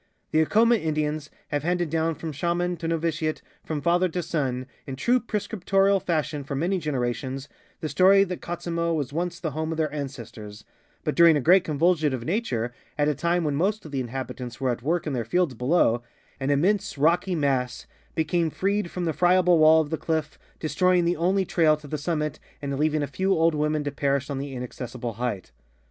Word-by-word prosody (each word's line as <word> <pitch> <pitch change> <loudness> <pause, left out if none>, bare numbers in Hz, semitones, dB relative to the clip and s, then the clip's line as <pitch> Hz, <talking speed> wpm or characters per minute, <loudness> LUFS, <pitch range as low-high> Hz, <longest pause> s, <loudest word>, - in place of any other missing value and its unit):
The 155 - +4
Acoma 230 +8 +4
Indians 155 -3 -2 0.2
have 145 -1 -1
handed 175 0 -1
down 165 0 0
from 160 +2 -5
shaman 175 +4 -1
to 165 0 -4
novitiate, 165 -1 -1 0.2
from 155 -2 -3
father 175 +4 +2
to 175 +1 -3
son, 130 -6 -2 0.2
in 135 - -4
true 245 - +2
prescrip 210 -4 -4
torial 195 0 +3
fashion 155 -3 -1
for 140 +1 -5
many 180 +7 0
generations, 135 -2 -3 0.3
the 155 - -2
stor}^ 195 +4 +5
that 180 0 -5
Katzimo 170 -1 -2
was 145 -3 -3
once 175 +2 -2
the 160 -3 -3
home 155 +2 -3
of 160 - -3
their 155 -2 -1
ancestors, 115 -7 -7 0.4
but - - 0
during 170 -2 +6
a - - +1
great 175 +7 +5
convulsion 155 -2 +2
of 120 -2 -7
nature, 125 - -1 0.2
at 145 0 +2
a - - +2
time 170 +3 0
when 150 -2 0
most 200 +7 0
of 155 - -9
the 135 - -2
inhabitants 125 -1 -5
were 130 -2 +1
at 120 - -4
work 165 +6 0
in 150 - -2
their 120 -3 -1
fields 175 +5 +1
below, 125 -1 +2 0.4
an 135 0 -2
immense 195 +8 +1
rockj' 170 +5 +2
mass 130 -4 0 0.3
became 165 +1 +1
freed 200 +3 -1
from 180 0 -3
the 160 - 0
friable 180 -1 +4
wall 160 +1 +7
of 150 -1 -5
the 160 - -1
cliff, 160 -2 -2 0.2
destroying 180 +2 +2
the 175 +1 +2
only 185 +4 +1
trail 160 -3 +3
to 150 -1 -12
the 150 +1 -4
sum 160 +3 -1
mit 150 -1 -3 0.2
and 140 -1 -3
leaving 155 0 +1
a - - +1
few 190 +8 0
old 165 -2 +3
women 150 0 0
to 145 - -2
perish 140 0 -1
on 135 - -2
the 140 -1 -5
inaccessible 125 -1 -5
height. 110 - -4
155 Hz, 205 wpm, -25 LUFS, 140-175 Hz, 0.4 s, wall